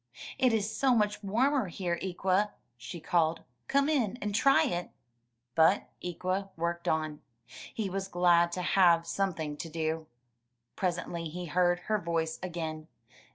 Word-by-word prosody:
*'It 255 -2 +4
is 220 -1 0
so 265 -2 +3
much 210 -2 +1
warmer 245 +4 +2
here, 175 -1 -3
Ikwa/' 190 +2 +1 0.3
she 125 +9 -8
called; 165 0 +1 0.3
come 280 0 +3
in 250 -8 +1
and 210 -2 -3
try 275 +8 +5
it.*' 180 -9 -2 0.6
But 165 +7 +4
Ikwa 185 +3 -2
worked 170 +1 -2
on. 155 -1 -1 0.5
He 220 -3 -2
was 195 +1 -3
glad 175 -2 +4
to 180 - -2
have 170 -3 +4
some 195 +1 -1
thing 150 -2 -4
to 165 - -6
do. 160 0 -2 0.7
Presently 175 -2 -2
he 175 +3 -5
heard 175 +2 +2
her 215 -1 0
voice 165 -2 -2
again. 160 -3 -5
180 Hz, 150 wpm, -30 LUFS, 165-205 Hz, 0.7 s, try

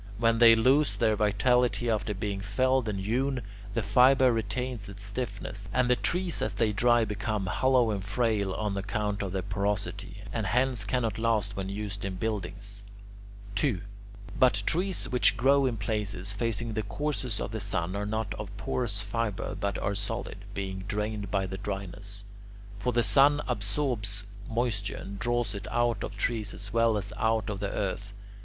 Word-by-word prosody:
When 115 0 +3
they 115 -1 +9
lose 135 +6 +3
their 110 - +3
vitality 120 +4 +2
after 105 -2 0
being 100 0 -3
felled 130 +4 +1
and 100 -2 -2
hewn, 125 +5 0 0.3
the 115 - +1
fibre 125 +5 +6
retains 115 0 -3
its 100 0 -8
stiffness, 100 -2 -4
and 125 -1 +2
the - - +6
trees 180 +5 0
as 105 - -1
they 110 0 +2
dry 120 +2 +4
become 105 -1 -2
hollow 125 +6 +3
and 100 -2 -2
frail 105 -1 +1
on 105 -2 -1
account 105 +1 -2
of 100 -2 -3
their 95 -1 -2
porosity, 100 0 -2
and 110 -4 -1
hence 125 -1 +2
cannot 115 -1 0
last 110 -3 +1
when 95 -1 -3
used 100 0 -4
in 95 -1 -3
buildings. 100 -1 -4 0.7
2. 105 -2 +1 0.6
But 105 -6 +4
trees 185 +3 0
which 125 -2 +4
grow 135 +2 +4
in 120 -3 -1
places 100 -3 -2
facing 115 +1 -2
the 110 - 0
course 130 -4 -2
of - - -3
the 110 - -3
sun 95 -2 -1
are 105 0 -2
not 110 -1 -2
of 105 -2 -5
porous 110 -1 -1
fibre 110 -1 -2
but 100 -2 -2
are 100 - -1
solid, 105 0 -4
being 95 -1 -3
drained 105 -1 -2
by 95 -1 +1
the 95 0 -5
dryness; 100 0 -5 0.5
for 125 +4 0
the 120 0 +2
sun 145 +3 +5
absorbs 105 -2 -1 0.3
moisture 115 -4 -1
and 100 0 -7
draws 120 -2 0
it 100 - -6
out 120 -3 +1
of 100 - -6
trees 110 -1 -1
as 100 0 -5
well 115 -1 +4
as 105 0 -4
out 110 -1 +1
of 100 - -4
the 100 0 -2
earth. 100 0 -3
105 Hz, 175 wpm, -29 LUFS, 100-120 Hz, 0.7 s, they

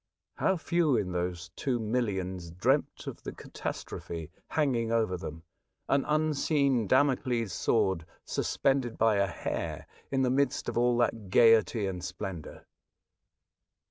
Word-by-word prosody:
How 190 - +2
few 165 -5 +2
in 95 -4 -1
those 90 0 -3
two 130 -3 0
millions 95 -6 -2
dreamt 85 +1 0
of - - -7
the - - -5
catastrophe 80 -2 -6 0.2
hanging 125 -7 +1
over 110 -5 +2
them, 80 -2 -7 0.4
an 135 0 +2
unseen 145 -5 +2
Damocles' 125 -5 +2
sword 85 -2 +1 0.2
sus - - -2
pended 135 -4 +1
by 110 -2 +3
a 100 0 +3
hair 90 - -4 0.2
in 135 -1 +1
the 125 - +2
midst 135 0 +1
of - - -3
all 120 0 +3
that 115 -4 0
gaiety 115 0 +5
and 90 -2 -4
splendour. 90 -2 -6
115 Hz, 135 wpm, -30 LUFS, 90-130 Hz, 0.4 s, gaiety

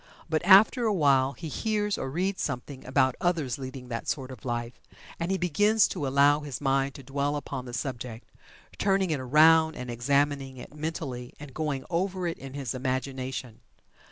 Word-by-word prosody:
But 160 -1 0
after 205 +6 +6
a 215 - +2
while 140 -4 +3
he 165 - -7
hears, 210 +5 -1
or 135 - -4
reads 185 +7 -1
something 135 0 -4
about 130 0 +3
others 160 -9 0
leading 130 -1 -7
that 115 -2 -4
sort 135 -3 -3
of 125 -5 -11
life, 120 -1 -4 0.4
and 170 +1 -2
he 190 - +1
begins 205 +5 +3
to 140 - -3
allow 140 +2 +4
his 145 -3 -6
mind 135 -1 +1
to 140 - -10
dwell 140 +2 -1
upon 140 -3 -5
the 120 - -8
subject, 125 -4 -5 0.5
turning 195 -3 +2
it 150 - 0
around 160 +4 +5
and 125 -1 -6
examining 140 +2 0
it 125 - -10
mentally, 150 -5 -5
and 145 -3 -10
going 150 -3 -2
over 185 +1 -1
it 170 -1 -3
in 135 0 -9
his 135 -5 -3
imagination. 130 -2 -3
140 Hz, 180 wpm, -28 LUFS, 130-165 Hz, 0.5 s, after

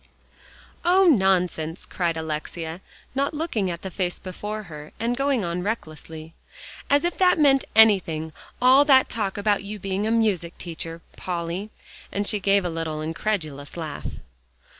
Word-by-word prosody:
"Oh! 370 +3 +5
nonsense," 185 - +2
cried 170 -3 -1
Alexia, 160 +2 -4 0.3
not 280 +3 0
looking 265 - -1
at 170 -1 -5
the 190 - -5
face 180 -1 -2
before 210 +3 -6
her, 150 -4 -10
and 235 +2 0
going 275 -3 +1
on 170 +1 -2
recklessly, 160 -5 -5 0.6
"as 285 +2 +4
if 345 0 -2
that 365 -1 +5
meant 275 -3 +4
anything, 175 -8 +4 0.3
all 260 +3 +7
that 265 -3 +5
talk 210 -4 -2
about 205 -1 +1
your 210 +1 -6
being 195 +2 -2
a - - +1
music 205 -7 +1
teacher, 165 -1 -7 0.2
Polly," 175 +3 -3 0.4
and 200 0 -2
she 210 - +2
gave 200 -1 +2
a - - 0
little 165 -2 -3
incredulous 155 -3 -3
laugh. 155 -3 -5
190 Hz, 150 wpm, -24 LUFS, 165-225 Hz, 0.6 s, all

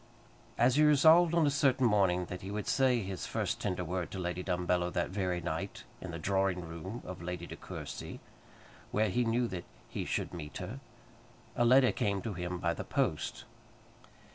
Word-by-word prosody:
As 125 +3 +4
he 155 - +6
resolved 160 +3 +6
on 165 -2 +4
a 145 - +3
certain 135 -2 +3
morning 95 -5 +3
that 90 +1 -7
he 95 - -6
would 105 +1 -3
say 130 -3 +3
his 95 -1 -5
first - - -2
tender 90 0 -1
word 90 +1 -3
to - - -6
Lady 90 -1 -2
Dumbello 90 -1 0
that 85 0 -1
very 95 -3 -1
night, 95 +8 -4 0.2
in 95 - -6
the 80 - -5
drawing 95 0 0
room 90 +8 -7
of 90 -2 -7
Lady 90 0 -4
De - - -8
Courcy, - - -7 0.7
where 110 0 +1
he 120 +6 +1
knew 120 +1 +1
that 90 -2 -5 0.2
he - - -3
should - - -2
meet 75 -4 -6
her, 105 +9 -6 0.8
a 120 - +3
letter 130 +1 +6
came 100 -1 0
to 110 - -3
him 90 0 -3
by 85 -1 0
the - - -5
post. - - -1
95 Hz, 190 wpm, -32 LUFS, 90-120 Hz, 0.8 s, he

